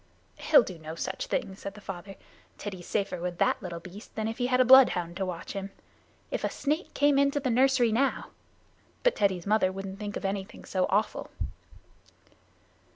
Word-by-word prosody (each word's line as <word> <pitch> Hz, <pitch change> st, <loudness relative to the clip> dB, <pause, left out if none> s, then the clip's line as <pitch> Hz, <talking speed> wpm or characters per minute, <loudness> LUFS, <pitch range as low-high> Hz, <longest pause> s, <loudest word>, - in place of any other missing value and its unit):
"He'll 290 Hz, -, +6 dB
do 185 Hz, -6 st, -8 dB
no 160 Hz, +1 st, -7 dB
such 190 Hz, +3 st, -4 dB
thing," 190 Hz, -, -2 dB
said 200 Hz, +1 st, -7 dB
the -, -, -10 dB
father. 195 Hz, -1 st, -8 dB, 0.4 s
"Teddy's 190 Hz, -4 st, -7 dB
safer 200 Hz, -4 st, -1 dB
with 175 Hz, -1 st, -3 dB
that 260 Hz, +4 st, +2 dB
little 175 Hz, -4 st, -5 dB
beast 185 Hz, +5 st, -12 dB
than 220 Hz, 0 st, -1 dB
if 225 Hz, +2 st, -5 dB
he 245 Hz, -, +1 dB
had 255 Hz, 0 st, +2 dB
a 255 Hz, -, +6 dB
bloodhound 215 Hz, -10 st, +6 dB
to 190 Hz, -1 st, -1 dB
watch 170 Hz, -2 st, -5 dB
him. 195 Hz, -1 st, -4 dB, 0.6 s
If -, -, -2 dB
a -, -, +1 dB
snake 305 Hz, +5 st, -2 dB
came 285 Hz, -1 st, +4 dB
into 280 Hz, +1 st, +2 dB
the 265 Hz, -3 st, -1 dB
nursery 255 Hz, -1 st, +4 dB
now 265 Hz, +5 st, 0 dB, 0.3 s
" -, -, -35 dB
But -, -, +3 dB
Teddy's 190 Hz, -4 st, +1 dB
mother 205 Hz, -2 st, +3 dB
wouldn't 195 Hz, 0 st, -7 dB
think 205 Hz, -1 st, -4 dB
of -, -, -6 dB
anything 195 Hz, 0 st, -4 dB
so 185 Hz, -1 st, 0 dB
awful. 205 Hz, +3 st, 0 dB
200 Hz, 190 wpm, -28 LUFS, 185-255 Hz, 0.6 s, He'll